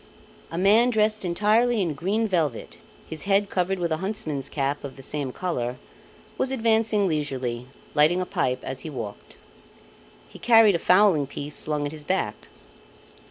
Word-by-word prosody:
A 165 - -6
man 210 +6 +5
dressed 215 -2 +1
entirely 215 +6 +2
in 175 -6 0
green 200 +10 -1
velvet, 160 - -2 0.3
his 160 +2 -7
head 200 0 +2
covered 185 +1 0
with 170 -2 -2
a 160 - +1
huntsman's 175 -7 -3
cap 140 0 -2
of 135 -2 -7
the 135 - -10
same 140 -1 -3
colour, 125 -8 -3 0.6
was 265 - 0
advancing 225 -4 +2
leisurely, 130 -6 -3 0.3
lighting 155 +5 +4
a 185 - -1
pipe 130 -7 -1
as 130 0 -5
he 160 - -5
walked. 115 -8 -8 0.9
He - - -14
carried 225 -3 +6
a 170 - 0
fowling 180 -5 +4
piece 145 +1 -6
slung 150 -1 -1
at 145 - -3
his 155 -1 -9
back. 125 - -2
170 Hz, 160 wpm, -25 LUFS, 145-210 Hz, 0.9 s, carried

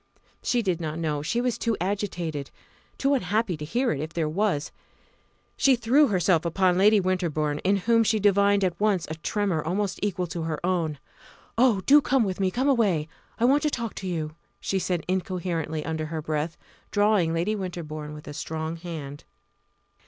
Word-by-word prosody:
She 240 -1 +1
did 180 -4 0
not 155 -1 -3
know; 155 -3 -1
she 195 +11 -1
was 245 -2 -1
too 230 -2 0
agitated, 175 -6 -3 0.5
too 275 +1 +2
unhappy 210 -4 0
to 150 - -8
hear 240 - 0
it 140 - -2
if 155 +2 -5
there 165 -2 0
was. 160 -2 0 0.8
She 270 -1 +4
threw 250 +6 +4
herself 180 -5 +2
upon 180 +1 +2
Lady 210 +2 +6
Winterbourne, 165 -6 0
in 195 +5 +2
whom 230 +4 +3
she 215 0 +2
divined 200 0 +4
at 175 -2 -1
once 200 -5 +2
a - - -4
tremor 175 +1 -1
almost 190 +4 -1
equal 190 -3 -1
to 170 0 -5
her 160 -1 -2
own. 170 -5 0 0.6
"Oh! 230 -5 +4
do 290 +8 +6
come 265 -2 +2
with 190 -2 -3
me 190 -1 +2
come 255 +8 -1
away! 200 - +2 0.3
I 235 - +3
want 280 +4 +4
to 300 - +1
talk 235 -6 -3
to 190 - -5
you!" 155 -4 -3 0.3
she 195 - -1
said 180 -3 -2
incoherently 175 -4 -2
under 160 0 -2
her 160 0 -4
breath, 155 +1 -2 0.3
drawing 205 -5 +3
Lady 170 +6 0
Winterbourne 155 -6 -5
with 150 - -11
a 145 - -6
strong 160 +2 -4
hand. 155 -5 -7
180 Hz, 180 wpm, -26 LUFS, 160-210 Hz, 0.8 s, Lady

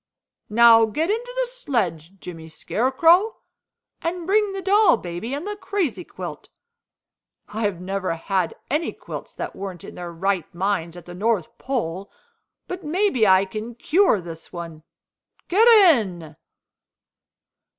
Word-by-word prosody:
Now 225 +1 +7
get 310 - -1
into 475 +3 -3
the - - +2
sledge, 195 - -3
Jimmy 165 -3 -9
Scarecrow, 325 - +2 0.6
and 340 +1 -3
bring 415 +2 +2
the 390 0 -5
doll 395 - +5
baby 175 +5 -6
and 295 +5 -5
the 415 0 -4
crazy 390 -5 -2
quilt. - - -8 1.0
I 220 - -5
have 205 -5 -1
never 185 -1 -2
had 185 +1 -1 0.2
any 310 +3 0
quilts - - -8
that - - -5
weren't 190 -3 -7
in - - -9
their 175 -1 -7
right 185 0 -1
minds 180 -2 -1
at 175 - -11
the 175 - -9
North 200 -2 -1
Pole, 200 -8 -3 0.6
but 365 0 -6
maybe 315 - +2
I 190 +1 +5
can 215 +4 -7
cure 340 - +3
this 165 -2 -10
one. 165 -3 -8 0.7
Get 430 +6 +5 0.3
in!" 175 - -4
220 Hz, 140 wpm, -23 LUFS, -, 1.0 s, Now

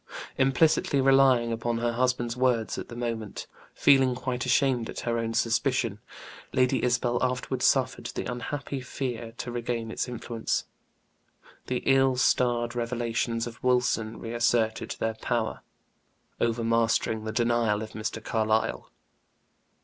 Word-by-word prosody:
Implicitly 135 +1 +3
relying 135 -3 +4
upon 115 +1 -2
her 120 0 0
husband's 120 -1 0
words 125 -3 +1
at - - -7
the 120 - -8
moment, 115 -3 -4 0.3
feeling 135 -3 +4
quite 125 0 -3
ashamed 125 -2 +2
at - - -5
her 115 -1 -1
own 115 0 -2
suspicion, 120 -2 +1 0.5
Lady 130 0 +2
Isabel 120 0 +1
afterward 125 0 -1
suffered 130 0 +2
the - - -5
unhappy 135 +2 -4
fear 120 -3 -5
to 120 - -5
regain 120 -1 -3
its - - -2
influence; 120 -2 -3 1.0
the 125 -1 -2
ill 135 -1 +4
starred 120 -2 +2
revelations 115 -1 -1
of 115 -1 -9
Wilson 125 -3 +1
reasserted 115 -1 0
their 110 0 -1
power, 110 0 -2 0.8
overmastering 115 -1 +1
the 110 - -3
denial 115 -2 +1
of 110 - -8
Mr. 110 0 -5
Carlyle. 110 -1 0
120 Hz, 125 wpm, -27 LUFS, 115-125 Hz, 1.0 s, relying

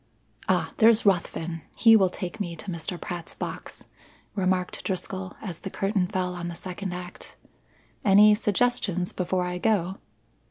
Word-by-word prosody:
"Ah, - - +1
there's 230 -3 +5
Ruthven! 170 -3 0
He 225 -2 +7
will 190 -4 +5
take 180 +4 -6
me 175 -5 -3
to 185 +4 -6
Mr. 170 +1 -4
Pratt's 175 -2 -6
box," - - -5 0.5
remarked 185 -2 0
Driscoll 185 0 -3
as 180 -6 -5
the 195 - -6
curtain 195 -1 0
fell 180 -1 -1
on 175 -1 -5
the 170 - -5
second 185 +2 -5
act. 180 0 -8 0.7
"Any 210 +1 +7
suggestions 210 -4 +1
before 180 0 0
I 180 0 -3
go?" 195 -3 +1
185 Hz, 150 wpm, -26 LUFS, 180-205 Hz, 0.7 s, He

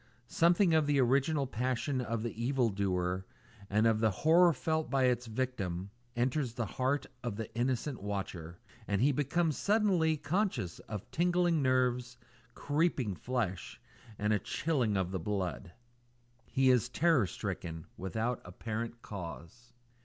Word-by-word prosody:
Something 170 +6 +3
of 155 -2 +3
the 145 -1 +3
original 140 +3 +2
passion 130 +2 -1
of 115 -2 -2
the 115 - -3
evil 125 -2 +2
doer, 95 -2 -1 0.5
and 105 +2 +3
of 110 -1 +3
the 110 0 +3
horror 165 - +5
felt 155 +3 -1
by 135 -2 +2
his 125 -1 +2
victim, 105 -6 -3 0.2
enters 125 0 0
the 120 - -1
heart 130 +5 -1 0.2
of 120 -4 -3
the 110 +1 -6
innocent 125 +2 -1
watcher, 95 -4 -5 0.3
and 100 -1 0
he 140 +6 +4
becomes 150 +3 0
suddenly 195 -7 +3
conscious 145 - -1
of 105 -3 -6
tingling 175 -1 +2
nerves, 125 -2 +1 0.4
creeping 145 - 0
skin, 110 0 -1 0.6
and 105 +1 +1
a 105 - +2
chilling 120 - 0
of 95 -1 -1
the 95 - -2
blood. 90 -6 -3 0.8
He 130 -1 +3
is 125 -1 +2
terror 150 - +3
stricken 80 -2 -5
without 110 +6 -2
apparent 115 +5 -5
cause. 95 +5 -8
125 Hz, 140 wpm, -32 LUFS, 105-145 Hz, 0.8 s, horror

